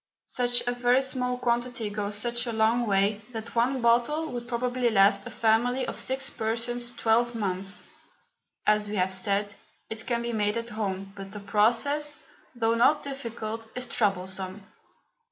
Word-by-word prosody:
Such 245 -1 +2
a 245 - +1
very 245 +1 +3
small 250 -1 -1
quantity 240 -2 -1
goes 205 0 -2
such 240 +2 0
a - - -1
long 225 +2 +2
way 200 +1 +2
that 225 0 -6
one 250 +3 +1
bottle 245 +7 +2
would 240 -1 -5
probably 245 0 0
last 200 -1 +4
a - - -5
family 240 +3 +2
of - - -5
six 265 +1 -2
persons 235 +1 -1
twelve 235 0 +2
months. 195 -2 -3 0.8
As 210 0 +3
we 210 - -3
have 185 -1 +1
said, 200 +2 0 0.4
it 220 0 -4
can 235 -1 0
be 235 0 -2
made 210 0 +1
at 230 0 -4
home, 195 -3 -3
but 195 -1 -8
the 210 - -6
process, 240 +9 +2 0.4
though 230 -1 +2
not 255 +6 +4
difficult, 230 -5 -5
is 250 0 -2
troublesome. 190 -3 -2
230 Hz, 160 wpm, -27 LUFS, 210-245 Hz, 0.8 s, last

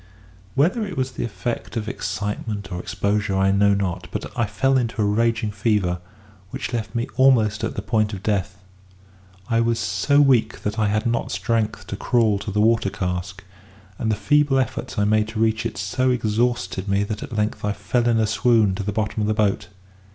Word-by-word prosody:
Whether 175 - +2
it 195 -3 -6
was 130 0 -1
the - - -4
effect 115 +2 -4
of 110 -1 -3
excitement 105 +1 -4
or 90 - -3
exposure 100 +2 -1
I 95 0 +3
know 100 0 +4
not; 90 -2 -2
but - - -4
I 115 -3 +1
fell 135 +6 +1
into 120 -3 0
a 105 - +3
raging 110 +1 +1
fever, 100 -4 0 0.5
which 130 +1 -5
left 115 -1 -3
me 120 0 0
almost 115 -6 +4
at - - -2
the 100 - -4
point 110 -2 +1
of 100 -2 -7
death. 100 -2 -2 0.8
I 115 0 +2
was 115 0 +1
so 95 +10 +2
weak 135 -5 +3
that 105 +2 -2
I 105 - +2
had 105 +1 0
not 115 0 -1
strength 105 +3 -1
to - - -5
crawl 110 -4 +2
to 105 - -6
the 105 +1 -1
water 110 -2 +3
cask; 90 +1 -4 0.6
and 110 - 0
the - - +2
feeble 140 +6 +3
efforts 130 - -2
I 105 - +2
made 110 +1 +2
to 110 0 -5
reach 110 0 +1
it 110 - -9
so 95 +8 0
exhausted 110 -5 0
me 100 +1 +2
that 105 +1 -4
at 115 - -6
length 105 +1 -1
I 105 - +1
fell 105 +4 0
in 115 - +3
a 110 - +3
swoon 110 -2 +3
to 100 - -4
the 105 - -2
bottom 110 +1 -2
of 105 - 0
the 110 - +1
boat. 105 -1 +1
105 Hz, 205 wpm, -22 LUFS, 100-115 Hz, 0.8 s, know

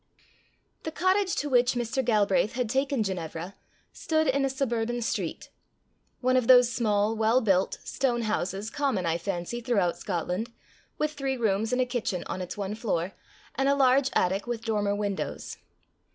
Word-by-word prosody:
The - - -4
cottage 370 +3 +1
to 295 - -1
which 250 -2 +3
Mr. 240 +2 -1
Galbraith 205 -4 +2
had 250 -1 -1
taken 270 -2 +1
Ginevra, 175 -1 -4 0.4
stood 315 -1 0
in 275 +1 +2
a 270 - +2
suburban 240 -3 -1
street 230 - -3 0.7
one 255 0 +2
of 255 -3 +2
those 250 -1 +7
small, 215 -2 +1
well 225 +3 +3
built 195 -6 +1
stone 240 -3 -1
houses 205 0 -2
common, 270 -10 0
I 165 0 0
fancy, 180 +6 -3
throughout 205 -8 +1
Scotland, 185 +5 -3 0.5
with 305 0 0
three 275 -3 -2
rooms 220 -1 0
and 250 - +1
a - - -3
kitchen 225 -8 -2
on 185 - -4
its 180 - -6
one 200 0 -3
floor, 195 -5 -2 0.4
and 270 +2 +1
a 280 - +4
large 270 0 +4
attic 190 +5 +1
with 235 -1 -4
dormer 205 -2 0
windows. 205 -1 -3
230 Hz, 165 wpm, -27 LUFS, 200-260 Hz, 0.7 s, those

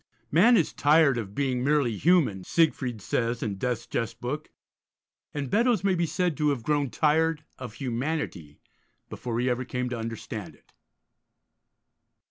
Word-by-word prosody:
'Man 225 - +6
is 165 - +1
tired 145 -3 +4
of 100 -3 -7
being 130 -3 0
merely 140 -5 +2
human,' 145 - +2
Siegfried 125 - 0
says, 115 +1 -1
in 100 -3 -3
Death's 120 -1 -2
Jest 115 0 -3
Book, 145 +5 -4 0.8
and 145 -2 -3
Beddoes 230 - +2
may 195 -1 +3
be 170 -2 0
said 180 -1 0
to 150 -1 +2
have 135 -5 -1
grown 145 0 +1
tired 160 +1 +1 0.2
of 125 -4 -7
humanity 120 - -3 0.5
before 120 -2 -3
he 125 - 0
ever 125 0 0
came 125 0 -3
to 125 -2 -4
understand 115 -1 -6
it. - - -30
130 Hz, 150 wpm, -27 LUFS, 115-155 Hz, 0.8 s, Man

